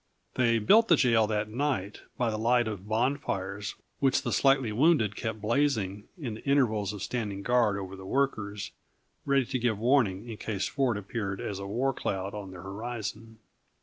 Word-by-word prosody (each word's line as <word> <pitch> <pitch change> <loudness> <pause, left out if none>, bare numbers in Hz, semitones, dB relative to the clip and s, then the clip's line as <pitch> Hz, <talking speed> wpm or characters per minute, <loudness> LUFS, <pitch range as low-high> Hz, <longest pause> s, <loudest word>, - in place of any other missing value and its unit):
They 120 -2 +3
built 215 - +5
the 170 - +6
jail 115 -6 +3
that 105 -1 -1
night, 115 -6 -2 0.2
by 120 -2 +1
the 110 - -3
light 120 +1 +3
of 100 -2 -5
bonfires 105 -5 -1 0.2
which 135 0 +2
the - - -2
slightly 135 -4 +3
wounded 120 - +3
kept 110 -2 -4
blazing 105 -4 0
in 130 -9 -4
the 110 - -9
intervals 110 -8 +2
of 105 -2 -6
standing 100 -2 -3
guard 120 -4 +3
over 95 -1 -6
the 95 0 -10
workers; 105 -6 -1 0.6
ready 140 -2 +3
to 130 +1 -2
give 115 -3 +1
warning 115 -3 +2
in 115 -2 -6
case 100 -3 -2
Ford 130 -6 0
appeared 100 -1 -4
as 100 -2 -4
a 100 - -5
war 125 +7 0
cloud 95 -3 -3
on 105 -2 -6
their 90 -2 -10
horizon. 110 +2 -6
110 Hz, 180 wpm, -29 LUFS, 100-125 Hz, 0.6 s, the